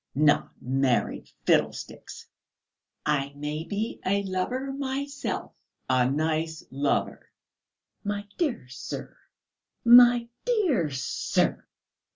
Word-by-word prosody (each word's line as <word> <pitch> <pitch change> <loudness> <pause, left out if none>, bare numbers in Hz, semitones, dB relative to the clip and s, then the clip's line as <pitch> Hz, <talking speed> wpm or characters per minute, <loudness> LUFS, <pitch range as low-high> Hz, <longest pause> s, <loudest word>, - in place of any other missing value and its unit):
"Not 145 +1 +2
married? 130 -1 0 0.2
Fiddlesticks!" - - -1 0.8
"I 140 -2 0
may 150 +2 -4
be 210 +5 -3
a 200 +1 +1
lover 245 +9 -2
myself!" 280 +1 -3 0.4
"A 125 -1 +3
nice 155 +2 -1
lover." 140 +2 -1 0.7
"My 205 0 -3
dear 270 - -1
sir, 130 +1 -7 0.7
my 240 0 +8 0.2
dear 365 - +2
sir! 130 -1 -1
185 Hz, 90 wpm, -27 LUFS, -, 0.8 s, my